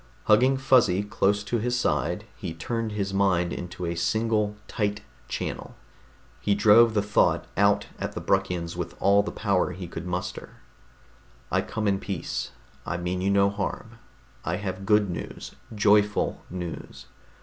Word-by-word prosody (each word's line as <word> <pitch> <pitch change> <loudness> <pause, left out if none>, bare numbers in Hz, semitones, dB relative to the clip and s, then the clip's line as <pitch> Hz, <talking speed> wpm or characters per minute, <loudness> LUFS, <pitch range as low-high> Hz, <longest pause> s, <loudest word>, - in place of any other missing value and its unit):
Hugging 125 +5 +4
Fuzzy 125 -8 +4
close 105 -1 +1
to 115 +3 -1
his 125 +2 0
side, - - 0
he 80 - -6
turned 115 +5 -3
his 100 -2 -2
mind 95 -3 +2
into 90 0 -5
a 85 - -1
single 105 +4 0
tight 105 -1 -1 0.3
channel. - - -5 0.6
He 100 - +1
drove 110 +2 +6
the 105 - +2
thought 105 0 +2
out 100 +1 +3
at - - -3
the - - -4
Bruckians 90 -4 0
with - - -5
all 100 +1 +5
the 105 - -4
power 95 -3 0
he 90 0 -7
could 85 +1 -7
muster: 90 0 -4 1.0
_I - - +1
come 110 -1 -2
in 100 -1 +2
peace. 95 -5 -4 0.3
I 90 - -3
mean 90 +1 -2
you 95 - +1
no 100 0 +4
harm. 110 +3 -5 0.4
I 85 - -1
have 95 -1 -5
good 105 -1 +4
news, 85 -3 -6 0.2
joyful 105 0 +3
news. 90 -2 -7
100 Hz, 155 wpm, -26 LUFS, 90-105 Hz, 1.0 s, drove